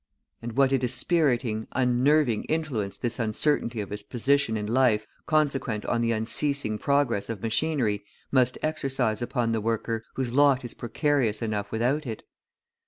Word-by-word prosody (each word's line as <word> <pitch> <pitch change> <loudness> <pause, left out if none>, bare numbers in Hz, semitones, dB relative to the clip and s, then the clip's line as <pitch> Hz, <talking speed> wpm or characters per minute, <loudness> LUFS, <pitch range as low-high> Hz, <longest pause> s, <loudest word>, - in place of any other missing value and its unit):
And 115 0 -5
what 135 +2 +3
a 135 - +3
dispiriting, 125 -3 +1
unnerving 130 0 +2
influence 140 -11 -2
this 120 -1 -2
uncertainty 115 +1 0
of 100 - -7
his 105 0 -4
position 120 +3 +1
in 105 - -3
life, 115 -2 +2 0.2
consequent 140 -8 +1
upon 120 - 0
the 115 0 +1
unceasing 110 +1 -1
progress 140 -7 +1
of 115 -1 -5
machinery, 115 -3 0 0.3
must 130 -2 +3
exercise 135 -7 -1
upon 120 -2 -1
the 115 -1 0
worker, 115 0 -1
whose 130 -3 -2
lot 140 -2 +4
is 120 - -7
precarious 120 -3 0
enough 105 -2 -2
without 130 +6 0
it! 110 -2 -5
120 Hz, 150 wpm, -26 LUFS, 110-140 Hz, 0.3 s, lot